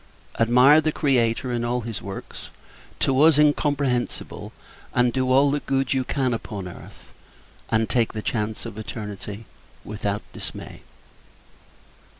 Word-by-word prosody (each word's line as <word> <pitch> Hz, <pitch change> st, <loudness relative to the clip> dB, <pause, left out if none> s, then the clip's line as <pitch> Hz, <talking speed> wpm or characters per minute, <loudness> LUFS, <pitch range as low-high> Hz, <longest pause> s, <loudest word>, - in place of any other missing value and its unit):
Admire 125 Hz, +6 st, +6 dB
the 155 Hz, -, 0 dB
Creator, 125 Hz, -4 st, +1 dB
and 120 Hz, -1 st, -1 dB
all 120 Hz, +1 st, 0 dB
his 110 Hz, -3 st, -5 dB
works, 95 Hz, 0 st, -8 dB, 0.5 s
to 135 Hz, +1 st, +2 dB
us 155 Hz, -1 st, +6 dB
incomprehensible: 145 Hz, -4 st, 0 dB, 0.4 s
and 125 Hz, -1 st, +3 dB
do 130 Hz, -1 st, 0 dB
all 140 Hz, +2 st, +5 dB
the 145 Hz, -, 0 dB
good 135 Hz, -1 st, 0 dB
you 130 Hz, -1 st, +1 dB
can 130 Hz, -1 st, 0 dB
upon 105 Hz, -4 st, -5 dB
earth; 90 Hz, -, -13 dB, 0.6 s
and 110 Hz, 0 st, +2 dB
take 120 Hz, -1 st, +1 dB
the 110 Hz, -1 st, -5 dB
chance 110 Hz, -1 st, -2 dB
of 110 Hz, -2 st, -7 dB
eternity, 105 Hz, -1 st, -7 dB, 0.4 s
without 105 Hz, -1 st, -3 dB
dismay. -, -, -8 dB
120 Hz, 135 wpm, -24 LUFS, 110-135 Hz, 0.6 s, Admire